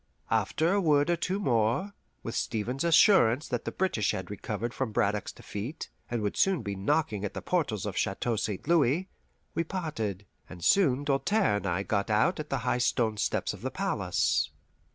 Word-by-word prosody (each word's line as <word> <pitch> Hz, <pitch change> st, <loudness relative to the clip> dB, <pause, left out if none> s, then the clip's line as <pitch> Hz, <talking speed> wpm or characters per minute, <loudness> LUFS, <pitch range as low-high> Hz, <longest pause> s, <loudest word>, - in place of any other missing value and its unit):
After 165 Hz, +4 st, +1 dB
a 200 Hz, -, +2 dB
word 150 Hz, -1 st, +3 dB
or -, -, +3 dB
two 185 Hz, +4 st, -2 dB
more, 125 Hz, -, +1 dB, 0.3 s
with 115 Hz, -, -4 dB
Stevens's 125 Hz, +8 st, -1 dB
assurance 155 Hz, -, +5 dB
that 120 Hz, -2 st, -2 dB
the -, -, -2 dB
British 180 Hz, -, 0 dB
had 95 Hz, 0 st, -5 dB
recovered 110 Hz, +3 st, -4 dB
from 130 Hz, -4 st, -2 dB
Braddock's 105 Hz, -3 st, 0 dB
defeat 120 Hz, +11 st, -7 dB, 0.2 s
and 120 Hz, -3 st, -2 dB
would 105 Hz, -, -1 dB
soon 190 Hz, -9 st, +2 dB
be 100 Hz, -1 st, -3 dB
knocking 105 Hz, 0 st, 0 dB
at 105 Hz, -, -4 dB
the -, -, -2 dB
portals 130 Hz, -, -1 dB
of 105 Hz, -, -3 dB
the -, -, -2 dB
Chateau 115 Hz, +4 st, -1 dB
St. 105 Hz, +2 st, -3 dB
Louis, 165 Hz, +2 st, +2 dB, 0.4 s
we 165 Hz, -, 0 dB
parted, 115 Hz, -, -4 dB, 0.2 s
and 90 Hz, -2 st, -10 dB
soon 145 Hz, -9 st, +4 dB
Doltaire 140 Hz, -, +2 dB
and -, -, -4 dB
I 90 Hz, +2 st, 0 dB
got 100 Hz, 0 st, -1 dB
out 110 Hz, -, +2 dB
at 155 Hz, -, -5 dB
the 135 Hz, -, 0 dB
high 125 Hz, -, +1 dB
stone 115 Hz, -3 st, +1 dB
steps -, -, -1 dB
of -, -, -11 dB
the -, -, -2 dB
palace. -, -, 0 dB
120 Hz, 190 wpm, -29 LUFS, 105-165 Hz, 0.4 s, assurance